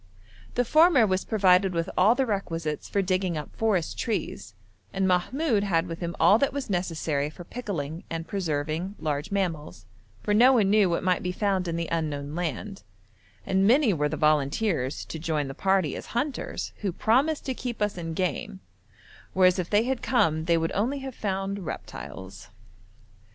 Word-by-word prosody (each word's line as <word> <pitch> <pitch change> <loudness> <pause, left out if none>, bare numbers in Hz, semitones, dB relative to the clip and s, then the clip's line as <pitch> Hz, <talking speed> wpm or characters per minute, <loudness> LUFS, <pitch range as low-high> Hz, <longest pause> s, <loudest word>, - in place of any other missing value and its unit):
The 245 - +2
former 310 -3 +5
was 190 -2 0
provided 190 -3 +3
with 165 0 -1
all 210 +6 +5
the 265 +1 +1
requisites 165 - -3
for 200 - +1
digging 185 -2 0
up 150 - -7
forest 205 -7 0
trees, 210 - -3 0.4
and 195 0 0
Mahmoud 210 - +1
had 170 -4 +1
with 165 -2 -6
him 170 -1 -4
all 195 +7 +6
that 280 - +2
was 275 -5 -4
necessary 160 -5 -1
for 175 +3 -11
pickling 170 - -5
and 165 0 -4
preserving 165 +1 -2
large 150 +2 -2
mammals, 175 - -3 0.4
for 205 - +1
no 245 +5 +6
one 210 -6 +3
knew 210 -3 +4
what 170 - -1
might 185 -1 +2
be 180 - -2
found 190 -1 0
in 165 - -2
the 170 0 -2
unknown 150 -3 -2
land; 180 +4 -4 0.6
and 190 +1 +2
many 250 -2 +4
were 150 -2 0
the 155 - -3
volunteers 150 - +1
to 160 - -7
join 155 -3 -1
the 135 - -6
party 190 -2 +1
as - - -7
hunters, 275 +1 -3
who 200 -3 -2
promised 265 - +1
to 265 - -1
keep 245 -2 -5
us 210 -1 0
in 165 -2 -5
game, 185 +1 -2 0.7
whereas 185 -1 +4
if 180 - -3
they 210 +1 +3
had 260 +1 -2
come 160 -11 +1
they 170 0 +3
would 165 0 -1
only 240 +8 0
have 265 -1 -6
found 195 -2 -3
reptiles. 95 +9 -8
185 Hz, 175 wpm, -26 LUFS, 160-210 Hz, 0.7 s, all